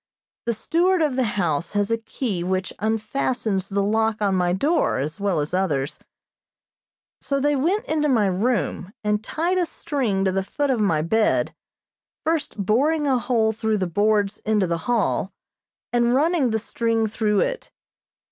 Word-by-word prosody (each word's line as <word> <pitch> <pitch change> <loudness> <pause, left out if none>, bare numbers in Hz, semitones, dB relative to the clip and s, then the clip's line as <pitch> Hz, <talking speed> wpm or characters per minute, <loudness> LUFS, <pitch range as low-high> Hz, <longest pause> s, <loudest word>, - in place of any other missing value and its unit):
The 235 - +1
steward 345 - +2
of 290 -4 0
the 260 - +2
house 170 -3 -1
has 205 +1 0
a 230 - +2
key 225 -5 -3
which 185 +1 -2
unfastens 220 -2 -1
the 200 0 0
lock 220 +1 +1
on 200 -2 +1
my 180 -1 +2
door, 290 - +1
as 150 +8 -3
well 200 -5 0
as 150 +3 -3
others; 150 -8 -1 1.2
so 275 -1 -1
they 290 +1 +2
went 365 - 0
into 300 -10 0
my 230 -6 +3
room 195 -1 -1
and 210 0 0
tied 350 +8 0
a 355 - +2
string 255 -13 -1
to 190 - +2
the 195 +1 0
foot 280 +8 -1
of 250 - 0
my 165 -8 +2
bed, 220 +6 +1 0.7
first 320 -5 -1
boring 275 - +2
a 265 -3 +2
hole 235 -2 +1
through 220 0 0
the 190 - 0
boards 205 +3 +1
into 215 -3 +1
the 170 -1 -1
hall, 220 -4 +1 0.6
and 240 0 +3
running 305 -2 +2
the 220 - +1
string 225 0 0
through 210 -1 +1
it. - - -2
220 Hz, 165 wpm, -23 LUFS, 195-270 Hz, 1.2 s, my